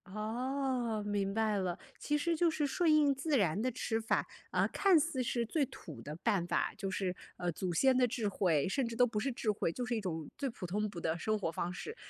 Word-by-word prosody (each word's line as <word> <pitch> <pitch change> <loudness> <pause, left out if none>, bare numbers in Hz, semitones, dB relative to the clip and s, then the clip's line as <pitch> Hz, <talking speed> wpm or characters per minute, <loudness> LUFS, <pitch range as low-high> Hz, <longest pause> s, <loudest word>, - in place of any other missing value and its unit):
哦， 240 0 -1
明 200 -1 0
白 215 -1 +1
了， 185 -3 -1 0.2
其 295 0 0
实 335 +3 +1
就 335 +1 +3
是 310 -2 0
顺 315 +3 +3
应 295 -2 +5
自 280 +1 +1
然 195 0 +2
的 255 - +1
吃 225 -1 -1
法， 225 - +1 0.3
啊 - - +3
看 385 -4 +4
似 300 -3 +1
是 240 -1 0
最 285 +5 +1
土 160 - -10
的 150 +2 -6
办 175 +1 +1
法， - - 0
就 200 -2 -3
是 190 -1 -1 0.2
呃 175 -1 -2
祖 175 +2 -3
先 260 +7 +4
的 250 - +4
智 225 -3 -1
慧， 170 -6 +2
甚 255 +3 0
至 230 - -5
都 245 +1 +5
不 220 -3 -2
是 270 +5 0
智 225 -2 0
慧， 205 - -1
就 245 +7 -3
是 245 - -1
一 - - 0
种 165 -5 -4
最 275 -2 -1
普 225 -5 -7
通 210 +4 -1
普 185 -4 -7
的 160 +1 0
生 215 +4 0
活 180 -5 -2
方 170 +2 -2
式， 450 - -6
225 Hz, 260 characters per minute, -33 LUFS, 190-265 Hz, 0.3 s, 应